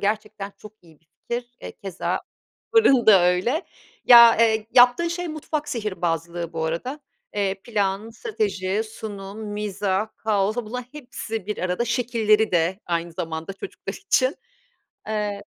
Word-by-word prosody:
Gerçekten 210 Hz, -1 st, -2 dB
çok 215 Hz, 0 st, -13 dB
iyi 160 Hz, -3 st, -20 dB
bir 165 Hz, -, -37 dB, 0.2 s
fikir. 240 Hz, 0 st, -4 dB
E, -, -, -7 dB
keza, 195 Hz, -3 st, -3 dB, 0.5 s
fırın 275 Hz, -, +5 dB
da 195 Hz, -5 st, +8 dB
öyle. 185 Hz, -, +2 dB, 0.4 s
Ya, 235 Hz, -1 st, +9 dB
eee, 220 Hz, -1 st, +3 dB
yaptığın 245 Hz, +7 st, +6 dB
şey 350 Hz, 0 st, -3 dB
mutfak 305 Hz, -1 st, -4 dB
sihirbazlığı 170 Hz, -6 st, -3 dB
bu 160 Hz, -1 st, -2 dB
arada. 210 Hz, -, -3 dB, 0.3 s
Eee, 195 Hz, -2 st, 0 dB
plan, 205 Hz, -1 st, -1 dB
strateji, 205 Hz, -2 st, -2 dB
sunum, 210 Hz, -1 st, -8 dB
mizah, 205 Hz, 0 st, -1 dB
kaos... 210 Hz, 0 st, 0 dB
Bunların 245 Hz, +1 st, -4 dB
hepsi 230 Hz, -7 st, -6 dB
bir 210 Hz, -, -3 dB
arada. 185 Hz, +6 st, -1 dB
Şekilleri 225 Hz, -3 st, +2 dB
de 175 Hz, +4 st, +1 dB
aynı 170 Hz, 0 st, -2 dB
zamanda 165 Hz, +2 st, -5 dB
çocuklar 195 Hz, 0 st, -7 dB
için. 255 Hz, -, +1 dB, 0.7 s
Eee 210 Hz, -2 st, -2 dB
210 Hz, 135 wpm, -23 LUFS, 190-235 Hz, 0.7 s, Ya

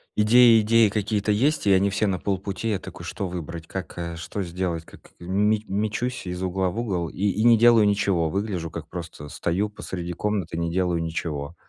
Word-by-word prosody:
идеи 115 Hz, +1 st, +6 dB
идеи 110 Hz, 0 st, +4 dB
какие-то 105 Hz, 0 st, -1 dB
есть, 135 Hz, +2 st, +1 dB
и -, -, +5 dB
они 100 Hz, +1 st, +3 dB
все 105 Hz, +2 st, 0 dB
на 90 Hz, -2 st, -1 dB
полпути. 100 Hz, +3 st, -2 dB
Я 100 Hz, -, -1 dB
такой: -, -, -10 dB
"Что 100 Hz, -, -4 dB
выбрать? 85 Hz, -2 st, -6 dB
Как, 95 Hz, -2 st, -6 dB
э, 85 Hz, -1 st, -4 dB
что 100 Hz, +4 st, -5 dB
сделать? 85 Hz, -2 st, -3 dB
Как?" -, -, -17 dB
Ме 100 Hz, +4 st, +1 dB
мечусь 110 Hz, +5 st, -2 dB
из 90 Hz, +1 st, -4 dB
угла 95 Hz, 0 st, 0 dB
в 110 Hz, -, -4 dB
угол 90 Hz, -8 st, -2 dB
и -, -, -14 dB
и 105 Hz, +4 st, 0 dB
не 120 Hz, -1 st, +7 dB
делаю 115 Hz, -2 st, +6 dB
ничего. 100 Hz, -5 st, +1 dB
Выгляжу, 95 Hz, -4 st, -3 dB
как 80 Hz, -1 st, -7 dB
просто 85 Hz, -4 st, -7 dB
стою 95 Hz, +9 st, -1 dB
посреди 90 Hz, -4 st, -6 dB
комнаты, 95 Hz, -3 st, -2 dB
не 85 Hz, 0 st, -1 dB
делаю 90 Hz, -2 st, 0 dB
ничего. 80 Hz, -1 st, -4 dB
95 Hz, 195 wpm, -24 LUFS, 85-105 Hz, -, не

